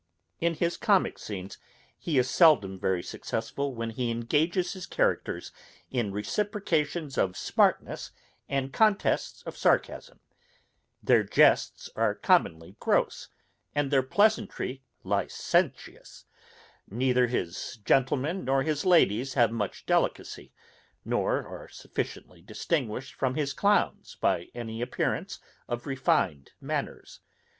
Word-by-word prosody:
In 170 0 +1
his 170 +2 -1
comick 200 -3 +2
scenes 95 -2 -7 0.4
he 160 -5 -2
is 125 -1 +3
seldom 120 - +4
very 90 -2 0
successful, 135 +4 -4
when 115 0 -3
he 120 +1 -2
engages 150 +10 0
his 185 -2 -8
characters - - -1 0.4
in 120 -6 -1
reciprocations 150 - -1
of 95 -1 0
smartness - - +1 0.4
and 135 -1 -2
contests 215 -2 +1
of - - -7
sarcasm; - - 0 0.8
their - - +5
jests - - +3
are - - +1
commonly 95 - +1
gross, - - 0 0.5
and 145 -1 0
their 135 -2 +4
pleasantry 200 -4 +1 0.2
licentious; - - -1 0.6
neither 125 +3 +2
his 115 +2 -3
gentlemen 140 +7 +1
nor 135 +1 +1
his 150 -1 -1
ladies 135 - +3
have 120 -4 +4
much 105 -4 -4
delicacy, - - -1 0.5
nor - - 0
are - - -9
sufficiently 90 -2 -6
distinguished 125 - -3
from 130 -1 -1
his 145 -2 -1
clowns 205 +5 +1
by 85 - +1
any 115 -1 -5
appearance 120 - -2 0.3
of 120 0 -4
refined 95 - 0
manners. - - -5
130 Hz, 115 wpm, -28 LUFS, 115-160 Hz, 0.8 s, their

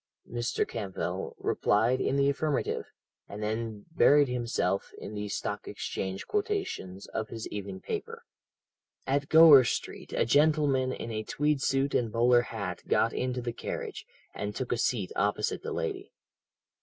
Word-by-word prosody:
Mr. 120 +1 -1
Campbell 100 -4 -4
replied 115 +5 +2
in 135 - +1
the 140 0 +3
affirmative, 140 +1 0 0.4
and 105 +1 -6
then 110 -1 -3
buried 145 -3 +5
himself 115 -6 -1
in 105 - -8
the 105 0 -4
Stock - - -3
Exchange 95 0 -4
quotations 395 - -2
of 110 -1 -3
his 115 -1 -6
evening 100 -2 -6
paper. - - -5 0.8
"At 140 +2 0
Gower 160 -4 +9
Street, 115 - -4
a - - +2
gentleman 145 -1 +3
in 115 - -5
a 110 -1 -2
tweed 145 +5 0
suit 135 +1 +1
and 115 -3 +1
bowler 120 +1 +4
hat 100 -7 -5
got - - +2
into 125 -1 -2
the 120 -1 -3
carriage, - - -5 0.3
and 105 0 -4
took 130 - -3
a 120 - +1
seat 105 -7 0
opposite 105 +1 0
the - - -5
lady. - - -3
120 Hz, 150 wpm, -29 LUFS, 105-140 Hz, 0.8 s, Gower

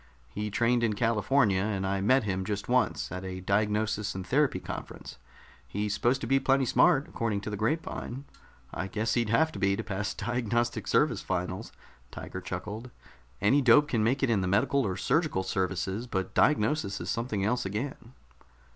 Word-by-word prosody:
"He 105 +8 -4
trained 120 +3 +2
in 115 -2 +1
California, 110 -1 +2
and 100 -2 -1
I 95 0 -1
met 130 +6 +4
him 95 -2 -2
just 100 +1 -3
once, 125 +1 +1
at 90 +2 -5
a 95 0 -5
diagnosis 105 +2 0
and 95 -1 -5
therapy 135 -3 +2
conference. 65 - -8 0.5
He's 105 +7 -2
supposed 125 +5 +1
to - - -3
be 135 +2 +3
plenty 135 0 +2
smart, 145 +3 +4
according 110 -3 -2
to 105 - -5
the - - -2
grapevine. 130 +2 -3 0.5
I 90 - -3
guess 110 +3 -1
he'd 120 -3 +1
have 160 +8 +3
to 100 - -8
be, 100 0 +2
to - - -4
pass 105 0 -3
Diagnostic 120 -1 -1
Service 130 -9 +2
finals." 90 0 -3 0.4
Tiger 95 - -7
chuckled. 100 +7 -6 0.5
"Any 120 +9 +4
dope 145 +4 +5
can 115 -5 +1
make 130 +5 +1
it 130 - +3
in 105 -4 +2
the 95 - -1
Medical 110 +6 +2
or 95 - -3
Surgical 155 - +1
Services, 95 +4 -2
but 95 -5 -3
diagnosis 120 -5 +2
is - - -3
something 115 -4 -2
else 125 +4 0
again." 115 +4 -5
110 Hz, 180 wpm, -29 LUFS, 95-125 Hz, 0.5 s, dope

